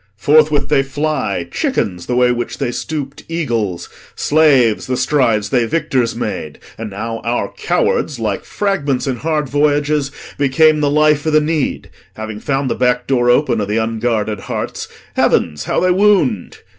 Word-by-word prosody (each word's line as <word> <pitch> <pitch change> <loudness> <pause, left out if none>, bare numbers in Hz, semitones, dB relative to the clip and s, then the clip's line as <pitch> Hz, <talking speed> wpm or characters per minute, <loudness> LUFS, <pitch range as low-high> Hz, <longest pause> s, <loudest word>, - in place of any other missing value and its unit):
Forthwith 150 +3 +3
they 140 -2 +3
fly, 135 - -2
Chickens, 90 -3 -2
the 125 - -1
way 125 0 +4
which 120 0 -3
they 120 - -2
stoop'd 145 +1 -5
eagles; 115 - -2 0.3
slaves, 140 -8 +3
The 130 -1 -1
strides 125 -6 +1
they 125 -3 +2
victors 135 -6 0
made; 105 -10 -4 0.2
and 115 -1 -6
now 115 +3 -5
our 115 -4 -2
cowards, 145 - 0
Like 110 -4 -2
fragments 145 -11 -1
in 130 -3 -2
hard 155 +1 -1
voyages, 145 0 +1 0.3
became 155 +3 +4
The 145 -1 +1
life 150 0 +2
o' - - +3
th' 155 -1 +3
need. 155 -2 -2 0.2
Having 110 -1 -6
found 135 +2 -1
the - - 0
back 125 -1 +1
door 120 -3 +1
open 120 -3 +2
Of 100 - -2
the 105 +2 -1
unguarded 110 -2 -1
hearts, - - -5 0.3
heavens, 75 -3 +1
how - - 0
they 185 - +2
wound! 180 - +2
130 Hz, 160 wpm, -17 LUFS, 115-150 Hz, 0.3 s, way